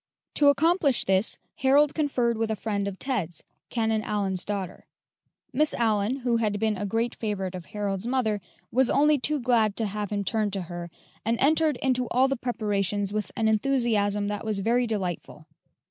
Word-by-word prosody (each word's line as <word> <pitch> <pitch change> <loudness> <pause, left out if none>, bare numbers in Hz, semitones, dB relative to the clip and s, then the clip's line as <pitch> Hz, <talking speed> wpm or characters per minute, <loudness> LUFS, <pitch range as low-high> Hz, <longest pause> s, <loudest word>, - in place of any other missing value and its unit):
To 290 - +4
accomplish 300 -1 +3
this, 190 +2 +2 0.2
Harold 285 +1 +4
conferred 255 -6 +1
with 225 0 -1
a 220 - 0
friend 200 -2 -2
of 195 -1 -5
Ted's, 195 - -3 0.3
Canon 220 -2 0
Allyn's 195 -4 -1
daughter. 195 -3 -5 0.7
Miss 300 +4 +2
Allyn, 220 0 +1
who 240 -1 +1
had 210 -3 0
been 220 0 +1
a 205 +1 -3
great 225 +4 -1
favorite 195 -4 -3
of 180 -2 -7
Harold's 205 0 -3
mother, 230 -5 0 0.3
was 255 +1 +3
only 295 +1 +4
too 300 +4 -1
glad 230 -5 +2
to 225 - 0
have 205 0 -3
him 205 -1 -2
turn 215 0 0
to 195 -2 -3
her, 175 0 -7 0.3
and 230 +2 0
entered 310 +1 +3
into 255 -2 +1
all 260 +2 +3
the 275 - 0
preparations 205 -5 -1
with 210 -2 -2
an 225 -1 +1
enthusiasm 215 -3 +1
that 205 0 -3
was 215 -2 -1
very 235 +5 +1
delightful. 190 -6 -4
220 Hz, 175 wpm, -26 LUFS, 205-250 Hz, 0.7 s, To